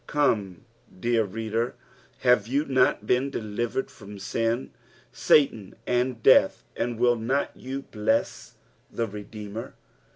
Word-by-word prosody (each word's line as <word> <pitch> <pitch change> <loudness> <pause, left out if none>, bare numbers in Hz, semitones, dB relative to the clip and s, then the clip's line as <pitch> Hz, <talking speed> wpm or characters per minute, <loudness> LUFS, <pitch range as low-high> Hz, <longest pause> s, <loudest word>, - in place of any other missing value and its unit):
Come, 105 - 0 0.3
dear 115 +1 +2
reader, 115 +3 -2 0.5
have 125 -4 +4
you 140 +5 0
not 130 -6 +2
been 125 +5 +2
delivered 120 +1 -3
from 100 0 -11
sin, 115 +5 -1 0.4
Satan, 115 -9 +2
and 125 -2 0
death, - - +5
and 120 -1 -2
will 120 0 +4
nut 130 +5 0
you 135 +2 -6
bless 110 -1 -1 0.4
the 115 - -1
Redeemer 105 +1 -8
115 Hz, 120 wpm, -26 LUFS, 105-125 Hz, 0.5 s, death